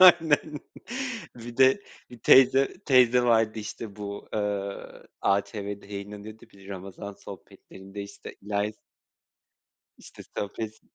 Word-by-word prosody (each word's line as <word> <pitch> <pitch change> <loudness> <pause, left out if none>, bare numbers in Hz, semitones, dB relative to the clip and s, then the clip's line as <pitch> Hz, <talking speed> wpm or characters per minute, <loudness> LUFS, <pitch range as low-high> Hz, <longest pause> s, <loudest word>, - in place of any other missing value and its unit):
Aynen. 160 -4 +6 0.8
Bir 120 0 -9
de 130 +9 +5 0.3
bir 120 - -11
teyze, 135 +2 +6
teyze 125 -3 +6
vardı, 115 -2 +3
işte, 105 0 -6
bu, 100 -1 -6
eee, 100 -1 -2 0.3
ATV'de 100 0 -1
yayınlanıyordu 105 +2 -8
bir 100 0 -15
Ramazan 100 +1 -7
sohbetlerinde 95 +1 -10
,işte, 100 0 -10
İlahi 105 +1 -1
s 105 - -31 1.2
İşte - - -12 0.2
sohbet... 110 +2 -4
105 Hz, 110 wpm, -27 LUFS, 100-120 Hz, 1.2 s, Aynen